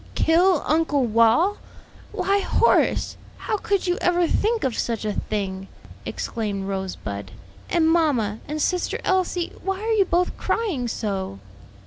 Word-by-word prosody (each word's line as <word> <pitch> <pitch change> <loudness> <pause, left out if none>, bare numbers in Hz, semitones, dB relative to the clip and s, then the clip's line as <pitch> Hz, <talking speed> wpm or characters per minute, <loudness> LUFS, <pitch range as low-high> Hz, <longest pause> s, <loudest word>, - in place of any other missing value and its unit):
"Kill 345 0 +3
Uncle 300 -4 +2
Wal! 230 - +3 0.5
why 400 +1 +1
Horace, 460 - +2 0.2
how 430 - -2
could 400 -1 -1
you 355 0 0
ever 355 0 +3
think 445 +7 +1
of 255 -4 0
such 230 -2 -2
a 210 - -1
thing?" 195 -3 -3 0.4
exclaimed 200 -4 -3
Rosebud. 180 - -5 0.4
"And 335 -2 +3
mamma 280 -11 +2
and 305 +1 -3
sister 360 +3 0
Elsie, 370 -2 0
why 385 0 -2
are 450 +1 -1
you 405 -3 +4
both 355 +1 0
crying 345 - -1
so?" 195 - -3
310 Hz, 135 wpm, -23 LUFS, -, 0.5 s, you